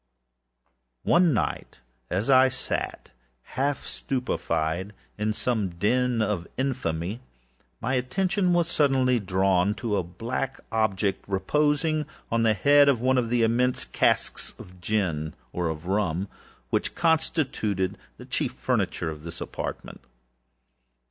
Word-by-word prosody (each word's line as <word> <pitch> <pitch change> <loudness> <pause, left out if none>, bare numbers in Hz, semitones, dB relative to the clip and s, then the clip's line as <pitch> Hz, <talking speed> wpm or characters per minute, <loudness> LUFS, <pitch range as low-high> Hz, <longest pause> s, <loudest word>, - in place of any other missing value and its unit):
One 175 -1 +4
night 110 - -2 0.3
as 95 +5 -1
I 130 -1 +6
sat, 130 0 -3 0.4
half 140 +1 -1
stupefied, 95 -7 -2 0.3
in 105 +1 0 0.2
a 125 - +3 0.2
den 120 +3 +2
of - - +1
more 105 -1 +1
than 85 - -13 0.2
infamy, 95 -2 -3 0.6
my 125 - -1
attention 180 +8 +1
was 175 -1 +3
suddenly 130 -6 +3
drawn 95 0 +2
to 115 -2 -4
some 90 -3 -2
black 130 +4 -3
object, 105 -3 0
reposing 150 - +1 0.2
upon 115 0 +1
the 110 -1 +3
head 145 +7 +6
of 130 -5 +3
one 130 +2 +3
of 120 -2 -1
the 120 -1 +2
immense 125 +3 +2
hogsheads - - 0
of 90 0 -13
gin, 85 -7 -1 0.2
or 90 -2 -1
of 80 +1 -5
rum, 95 -1 0 0.4
which - - 0
constituted 145 - +1 0.2
the - - -11
chief - - -1
furniture 80 - -1
of 75 -1 -9
the 85 +1 -7
apartment. - - -6
115 Hz, 130 wpm, -26 LUFS, 95-130 Hz, 0.6 s, I